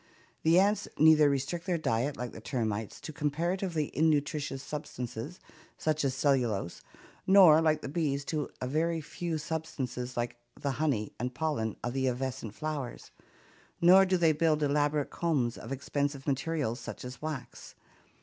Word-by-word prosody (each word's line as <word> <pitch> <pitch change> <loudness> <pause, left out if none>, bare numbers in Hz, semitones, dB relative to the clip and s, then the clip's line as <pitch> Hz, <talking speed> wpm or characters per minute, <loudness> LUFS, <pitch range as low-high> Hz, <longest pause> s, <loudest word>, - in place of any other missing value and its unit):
The 165 +2 +4
ants 205 +2 +2
neither 155 -1 +6
restrict 140 +6 -2
their 180 -2 +1
diet, 140 -1 -1
like 125 0 -4
the 110 - -10
termites, 110 -4 -3
to 155 - -7
comparatively 165 +2 -1
innutritious 145 -3 +1
substances 135 +1 -6 0.4
such 155 -1 0
as 135 -2 0
cellulose, 125 - 0 0.5
nor 185 -5 +8
like 155 -1 +2
the - - -3
bees 145 -2 -1
to 150 -1 -2
a - - -3
very 165 +4 0
few 165 +2 -4
substances 140 -6 -4
like 120 0 -2 0.2
the 140 - -1
honey 125 -9 0
and 125 +1 -3
pollen 140 -9 -1
of 120 - -2
the 130 0 0
evanescent 125 -3 -3
flowers, 150 -5 -5 0.7
nor 185 +3 +8
do 185 0 +2
they 165 -2 +4
build 155 0 +2
elaborate 145 0 +1
combs 140 -9 0
of - - -9
expensive 140 0 -2
materials, 140 -3 -1
such 120 - -7
as 125 0 -8
wax. 150 -5 -6
145 Hz, 150 wpm, -30 LUFS, 130-160 Hz, 0.7 s, nor